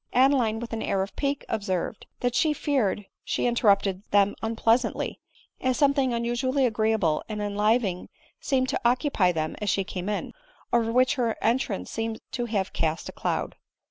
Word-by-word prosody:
Adeline 255 -4 +4
with 235 0 -6
an 225 - -2
air 195 -1 0
of 195 - -8
pique 280 0 -1
observed, 200 -2 -2
that 245 -1 +1
she 310 +2 +3
feared 255 -9 0 0.2
she - - -1
interrupted 200 -5 +2
them 200 0 +4
unpleasantly, 225 +2 0 0.4
as 255 -1 +1
something 280 -3 +3
unusual 240 +2 -1
ly 280 - +2
agreeable 220 -9 +2
and 215 -1 -4
enlivening 205 -1 0 0.3
seemed 260 -2 +1
to - - -1
occupy 240 - +2
them 155 -2 -2
as 210 - +1
die 195 - 0
came 185 +1 -5
in, 210 - -3 0.4
over 230 -1 +3
which 255 +2 +4
her 230 -2 0
entrance 225 - 0
seemed 225 0 -3
to 240 - -2
have 205 -5 -2
cast 160 0 -1
a - - -5
cloud. - - -2
225 Hz, 170 wpm, -26 LUFS, 200-250 Hz, 0.4 s, Adeline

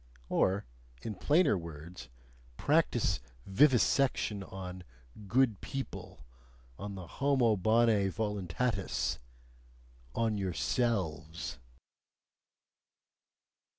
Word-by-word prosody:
Or, 95 +2 +2 0.4
in 110 - -3
plainer 150 - +3
words, 85 -5 -8 0.5
practise - - +2 0.3
vivisection 125 -2 +3
on 95 -1 -7 0.4
"good 115 -2 +2
people," 135 -1 -6 0.5
on 100 -1 -5
the 95 -2 -7
"homo 125 +2 +2
bonae 110 0 +3
voluntatis," 95 - -1 1.0
ON 110 -2 +1
YOURSELVES! 90 - -1
100 Hz, 70 wpm, -32 LUFS, 90-115 Hz, 1.0 s, plainer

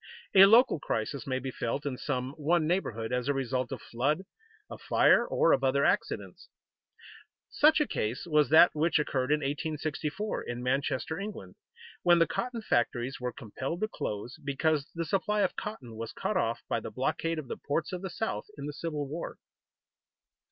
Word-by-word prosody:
A 195 0 +9
local 225 - +6
crisis 115 +2 -3
may 130 -1 0
be 130 0 -4
felt 130 +4 -3
in 140 -3 -2
some 130 -1 -3
one 155 +2 +1
neighborhood 125 - -1
as 125 0 -1
a 145 - +1
result 130 -2 -1
of - - -6
flood, 145 +9 -1 0.4
of - - -10
fire, 240 - +4
or 165 - +3
of - - +1
other 135 +1 +3
accidents. 475 - -1 1.0
Such 310 +2 +5
a 300 - +3
case 115 - -3
was 150 -5 +3
that 160 +3 +7
which 160 +2 +2
occurred 135 -3 0
in 150 0 +3
1864, 155 +6 -3
in 120 +1 -5
Manchester, 135 +5 -1
England, 205 +1 -7 0.5
when 175 -1 +5
the 165 - +5
cotton 235 +2 -3
factories 120 - 0
were 125 0 -2
compelled 130 - -5
to 215 - +1
close 120 - -5
because 145 +1 0
the 165 0 -2
supply 205 +5 0
of - - +1
cotton 130 - -6
was 115 0 -6
cut - - -2
off - - 0
by - - 0
the - - -7
blockade 165 0 -1
of 155 -4 -5
the - - -5
ports 155 +5 -2
of 180 - -4
the 190 - -4
South 220 +5 -3
in 140 - -6
the 145 - -5
Civil 150 -2 -4
War. 160 +5 -6
150 Hz, 180 wpm, -29 LUFS, 130-170 Hz, 1.0 s, A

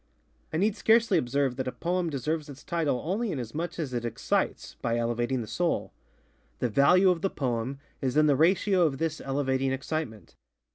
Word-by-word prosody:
I 155 - -1
need 205 +4 +2
scarcely 225 -5 +4
observe 130 -1 0
that 130 - -2
a - - -1
poem 175 +2 -1
deserves 150 +2 -2
its 140 0 -11
title 155 -7 -1
only 205 +6 -1
inasmuch 155 +6 -4
as 150 -7 -3
it 120 -1 -2
excites, 115 -1 -1
by 115 0 0
elevating 120 +2 0
the 110 - -6
soul. 170 +10 -1 0.6
The 125 - 0
value 180 - +5
of 170 -2 -2
the 195 - +1
poem 125 -2 -2 0.2
is 130 +1 0
in 155 - +6
the 145 -2 +4
ratio 185 +5 +3
of 135 -3 -3
this 160 +1 -2
elevating 135 -1 0
excitement. 135 -5 -4
145 Hz, 180 wpm, -28 LUFS, 125-170 Hz, 0.6 s, in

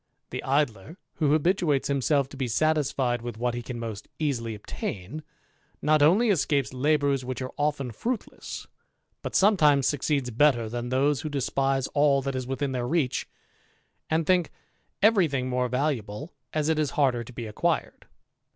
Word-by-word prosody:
The - - -4
Idler, 140 - -1 0.2
who 150 -3 +2
habituates 155 -3 +2
himself 140 0 +1
to - - -11
be 135 -2 -2
satisfied 135 -2 +1
with 120 -2 -6
what 120 +1 -1
he 120 - -3
can 120 0 -6
most 115 -3 -6
easily 120 -7 -2
obtain, 105 +5 -6 0.6
not 155 0 +3
only 200 +10 +5
escapes 145 -7 +1
labours 140 0 +1
which 130 0 -4
are 130 -1 -5
often 145 -3 -1
fruitless, 230 - -5 0.6
but - - -5
sometimes 150 -9 +5
succeeds 140 -3 0
better 120 -2 +3
than 120 +1 -4
those 135 +2 +2
who 155 - -4
despise 135 -1 0
all 145 -2 +3
that 135 0 -2
is 130 -1 -3
within 135 +1 -2
their 125 -2 -2
reach, 145 -3 0 0.8
and 160 0 +1
think 180 -2 +3 0.5
every 205 -5 +5
thing 135 -3 -2
more 125 0 0
valuable 130 - -2 0.2
as 155 -1 0
it 160 -1 +2
is 150 -2 +1
harder 130 -5 +2
to 115 - -12
be 120 -1 -6
acquired. 105 - -2
140 Hz, 160 wpm, -26 LUFS, 125-150 Hz, 0.8 s, only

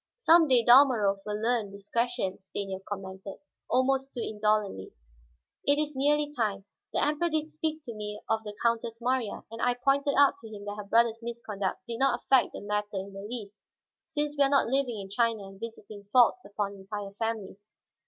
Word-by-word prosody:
"Some 335 -8 +6
day 250 -4 +4
Dalmorov 240 -6 +6
will 210 0 -2
learn 225 -2 0
discretion," 205 0 -2
Stanief 190 0 -5
commented, 190 -1 -7 0.3
almost 265 +2 +2
too 240 - -3
indolently. 210 - -1 0.7
"It 285 +1 +3
is 300 -1 -1
nearly 295 +2 +2
time. 205 -5 -1 0.3
The - - +2
Emperor 300 +4 +1
did 310 -1 -2
speak 315 0 -3
to 240 -5 -7
me 210 -1 -5
of 220 0 0
the 210 -1 -7
Countess 230 -1 0
Marya, 245 -2 -1
and 230 +1 -7
I 245 0 +2
pointed 275 +3 +1
out 285 0 +5
to 235 - -12
him 205 -1 -9
that 205 0 -5
her 210 - -6
brother's 230 +1 +3
misconduct 215 -5 -4
did 230 0 -4
not 275 0 +3
affect 260 -4 +4
the - - -7
matter 210 0 -2
in 195 +1 -5
the 195 - -7
least; 210 -1 -7 0.4
since 295 0 -2
we 285 - +4
are 275 - +3
not 280 -1 +4
living 255 -2 0
in 195 - -6
China 230 -1 +1
and 195 0 -12
visiting 215 -2 -9
faults 245 - +4
upon 205 -1 -3
entire 200 +1 -7
families. 215 -2 -4
230 Hz, 185 wpm, -29 LUFS, 205-265 Hz, 0.7 s, Some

